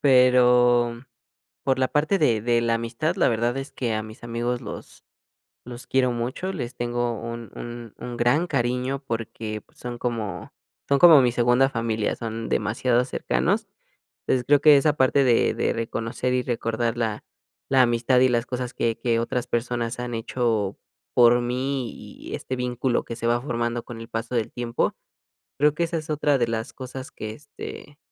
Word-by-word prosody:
pero 125 -2 +5 0.6
por 135 -1 +1
la 130 0 +2
parte 155 +8 +1
de 115 - +2
de 120 0 +2
la 115 0 +1
amistad 115 +9 -2
la - - +3
verdad 120 +2 0
es 135 +1 -5
que 120 -4 -2
a 110 - -1
mis 110 +2 -11
amigos 120 +1 -2
los - - -9 0.6
los 125 0 -9
quiero 130 -2 +2
mucho, 130 +11 -3
les 125 -7 -5
tengo 120 -1 -2
un 115 -2 -7
un 120 -2 -8
un 120 0 -6
gran 140 +9 +2
cariño 125 +2 -1
porque 110 -2 -4
son 120 -1 -6
como 110 -7 -4 0.3
son 140 -1 +3
como 160 -6 +9
mi 120 -1 +2
segunda 120 +2 +4
familia, 115 -3 -1
son 115 0 -5
demasiado 120 +3 +1
cercanos. 65 - -1 0.5
Entonces, 130 - +1
yo - - -24
creo 145 -1 +5
que 150 -1 +8
esa 145 +2 +3
parte 135 +1 +4
de 120 -2 +3
de - - 0
reconocer 115 +2 -2
y 125 - +1
recordar 115 -1 -1
la 110 -2 -2 0.5
la 135 -1 +4
amistad 120 +1 +3
y 130 - +5
las 120 -1 +1
cosas 125 -1 -4
que 115 -1 -1
que 115 -2 +1
otras 120 +1 -2
personas 120 0 -2
han 125 0 -4
hecho 115 -3 -1 0.4
por 120 0 +6
mí 130 +1 -2
y - - -10
este 130 - -4
vínculo 125 0 0
que 115 - -6
se 115 - -3
va 120 +1 +2
formando 120 -2 -2
con 120 -2 -9
el 115 - -10
paso 115 +2 -4
del 115 -2 -1
tiempo. 120 -1 -1 0.6
Creo 150 +1 +4
que 170 - -1
esa 170 0 -2
es 155 0 -6
otra 145 -2 +2
de 120 -2 +1
las 115 +2 -3
cosas 130 0 -8
que, 110 0 -6
este, 145 +2 -10
120 Hz, 180 wpm, -24 LUFS, 115-130 Hz, 0.6 s, como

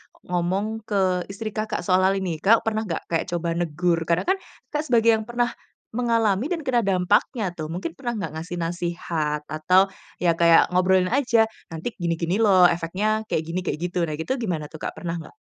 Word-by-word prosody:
o - - -24
ngomong 180 +3 0 0.2
ke 185 -3 +1
istri 215 +2 -4
Kakak 215 0 -2
soal 185 -1 +3
hal 195 - +3
ini 180 -4 -2
Kakak 225 +3 +5
pernah 220 0 +1
nggak 165 - -3
kayak 165 -1 0
coba 170 -1 -1
negur? 170 +1 0
Karena 170 +1 +2
kan 380 - +3 0.3
Kakak 300 0 -1
sebagai 230 -1 +5
yang 220 - -3
pernah, 240 0 0 0.4
mengalami 230 -1 +1
dan 330 -2 -3
kena 255 -3 +2
dampaknya 195 +2 +1
tuh 155 -3 -6
mungkin 180 - -4
pernah 240 -3 -3
nggak, 165 -8 -4
ngasih 170 +2 -6
nasihat 165 -3 -2
atau, 180 +6 +2 0.3
ya 170 - +5
kayak 170 0 +5
ngobrolin 185 0 +3
aja, 245 -4 +3 0.2
nanti 165 +8 -5
gini 170 -1 0
gini 170 +5 -1
loh, 195 -5 +5
efeknya 190 +6 +1
kayak 160 - -1
gini, 165 +3 -3
kayak 185 - -2 0.2
gitu 180 - -2
nah 155 - -3
gitu 245 - -2
gimana 165 -10 -3
tuh 160 - -10
Kak, - - -5
pernah 170 -1 -4
nggak? 160 - -12
185 Hz, 200 wpm, -24 LUFS, 170-220 Hz, 0.4 s, Kakak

